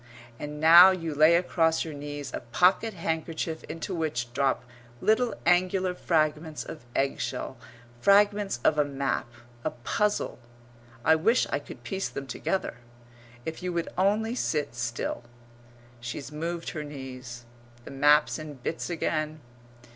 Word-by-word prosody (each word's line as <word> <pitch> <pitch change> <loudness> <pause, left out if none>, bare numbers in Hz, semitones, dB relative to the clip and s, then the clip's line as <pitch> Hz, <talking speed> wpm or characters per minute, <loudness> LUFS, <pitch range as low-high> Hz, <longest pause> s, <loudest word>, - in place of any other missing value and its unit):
And 150 0 -6
now 170 +4 +10
you 165 -4 -2
lay 155 +3 +6
across 165 -2 +2
your 160 - -6
knees 145 0 -6
a - - -2
pocket 185 - +2
handkerchief 160 -1 -3
into 165 +4 -5
which 135 -8 -2
drop 135 0 +1 0.4
little 220 - +2
angular 180 +1 +3
fragments 155 -2 0
of - - -9
eggshell 130 -2 -2 0.4
fragments 205 -1 +3
of 155 - +3
a - - +6
map 140 -2 -2 0.4
a - - 0
puzzle. 205 - -1 0.7
I 160 - +7
wish 220 +10 +3
I - - +1
could - - -12
piece 195 -1 -3
them 140 - -6
together! 185 +8 -2 0.7
If 160 0 -5
you 180 0 -2
would 170 -1 -2
only 210 +5 +2
sit 150 - -1
still. 120 0 -3 0.8
She's 120 +4 -6
moved 165 +3 -4
her 155 - -5
knees 130 -4 -8 0.4
the - - -9
map's 145 +3 +4
in 155 -2 -7
bits 135 +7 -4
again. 155 -2 -2
160 Hz, 140 wpm, -27 LUFS, 140-180 Hz, 0.8 s, now